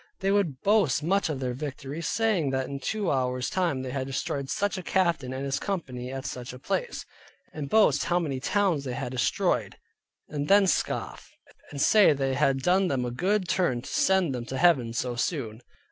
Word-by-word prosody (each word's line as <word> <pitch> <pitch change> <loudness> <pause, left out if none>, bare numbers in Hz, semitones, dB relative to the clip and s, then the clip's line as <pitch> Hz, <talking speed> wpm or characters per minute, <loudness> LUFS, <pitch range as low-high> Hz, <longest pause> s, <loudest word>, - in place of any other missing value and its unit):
They 195 0 +1
would 175 -10 0
boast 195 - +2
much 195 +2 +1
of 145 -4 -3
their 125 -2 -2
victories; 145 +3 -5
saying 215 -10 +1
that 130 -1 -1
in 140 0 -5
two 210 +3 -1
hours 125 -1 -1
time 170 -8 0
they 130 - -5
had 130 0 -3
destroyed 135 0 -3
such 205 0 -1
a 185 - -4
captain 170 -8 0
and 130 +1 -4
his 140 0 -1
company 130 -10 -4
at 135 0 -6
such 125 0 -6
a - - -9
place; 485 - -3 0.5
and 145 -3 -5
boast 220 +5 +4
how 175 - +1
many 145 -7 -2
towns 175 0 +1
they 130 -2 -4
had 125 - -4
destroyed, 125 -6 0 0.5
and 145 -1 -4
then 200 0 +6
scoff, 185 - -2 0.4
and 140 - -7
say 210 +4 +6
they 135 -1 -1
had 135 -1 +1
done 185 +3 +3
them 130 -6 -1
a 120 - -3
good 185 +8 0
turn 130 -11 0
to - - -8
send 190 -6 +2
them 120 -2 -4
to 130 - -4
Heaven 135 -8 +3
so 120 +1 -2
soon. 120 -4 -3
140 Hz, 200 wpm, -27 LUFS, 130-185 Hz, 0.5 s, then